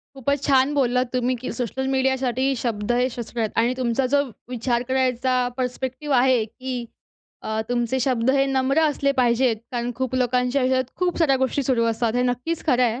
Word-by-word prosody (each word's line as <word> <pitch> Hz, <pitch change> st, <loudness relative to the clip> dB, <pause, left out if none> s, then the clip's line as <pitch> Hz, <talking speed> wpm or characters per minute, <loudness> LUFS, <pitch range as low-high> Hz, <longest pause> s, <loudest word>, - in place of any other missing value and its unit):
खूपच 280 Hz, +2 st, -1 dB
छान 270 Hz, 0 st, +3 dB
बोललात 250 Hz, -2 st, +2 dB
तुम्ही 250 Hz, 0 st, 0 dB
की 255 Hz, -, -6 dB
सोशल 260 Hz, +2 st, -2 dB
मीडियासाठी 265 Hz, 0 st, +1 dB
शब्द 215 Hz, -2 st, -2 dB
हे 250 Hz, +1 st, +2 dB
शस्त्र 235 Hz, 0 st, -6 dB
आहेत. 220 Hz, -, 0 dB
आणि 235 Hz, +2 st, +2 dB
तुमचा 255 Hz, +1 st, 0 dB
जो 285 Hz, +2 st, +2 dB, 0.3 s
विचार 240 Hz, -1 st, -1 dB
करायचा 255 Hz, -1 st, +1 dB
पर्स्पेक्टिव्ह 260 Hz, +3 st, -3 dB
आहे 250 Hz, -2 st, +3 dB
की 250 Hz, +2 st, -6 dB, 0.6 s
अ, 220 Hz, 0 st, -1 dB
तुमचे 245 Hz, +1 st, 0 dB
शब्द 250 Hz, -1 st, 0 dB
हे 275 Hz, 0 st, +3 dB
नम्र 270 Hz, +3 st, +1 dB
असले 285 Hz, -2 st, +1 dB
पाहिजेत. 245 Hz, -2 st, +2 dB, 0.2 s
कारण 240 Hz, 0 st, -2 dB
खूप 260 Hz, +1 st, -3 dB
लोकांच्या 250 Hz, +1 st, +1 dB
आयुष्यात 260 Hz, 0 st, +2 dB
खूप 360 Hz, -1 st, -1 dB
साऱ्या 280 Hz, -5 st, +3 dB
गोष्टी 265 Hz, +2 st, 0 dB
सुरू 245 Hz, -3 st, +1 dB
असतात. 230 Hz, 0 st, 0 dB
हे 250 Hz, -, +2 dB
नक्कीच 250 Hz, +7 st, -2 dB
खरं 255 Hz, -4 st, +3 dB
आहे. 240 Hz, 0 st, +1 dB
255 Hz, 180 wpm, -23 LUFS, 240-265 Hz, 0.6 s, छान